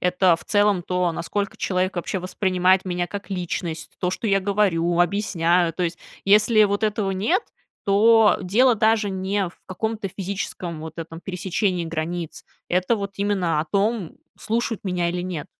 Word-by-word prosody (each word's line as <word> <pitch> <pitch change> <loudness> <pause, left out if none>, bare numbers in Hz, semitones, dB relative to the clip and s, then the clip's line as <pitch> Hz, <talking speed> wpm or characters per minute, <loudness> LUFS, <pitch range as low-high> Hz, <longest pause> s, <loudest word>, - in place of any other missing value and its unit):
это 180 -1 +3
в - - -13
целом 205 -3 +2
то, 180 -1 0
насколько 200 +4 -3
человек 185 0 -1
вообще 180 +2 -2
воспринимает 185 0 +1
меня 175 -1 -2
как 200 +1 -7
личность, 175 -3 -4
то, 180 - 0
что 220 - -4
я 195 -1 +3
говорю, 185 -4 +1
объясняю. 175 -2 +2
То 180 - -2
есть 170 -1 -2 0.3
если 210 +2 +5
вот 200 +1 -1
этого 210 -2 0
нет, 215 - +1 0.4
то 220 +2 +5
дело 230 +7 +4
даже 220 -1 +2
не 190 0 -1
в - - -25
каком-то 215 +2 -3
физическом 185 -4 -4
вот 160 0 -8
этом 165 0 -7
пересечении 180 0 -1
границ, 165 +1 -4 0.2
это 185 +6 +1
вот 200 -1 -4
именно 195 -6 0
о 155 - -4
том, 205 -2 0 0.2
слушают 225 0 -2
меня 175 -2 0
или 180 - -3
нет. 175 -4 -4
190 Hz, 160 wpm, -23 LUFS, 175-205 Hz, 0.4 s, если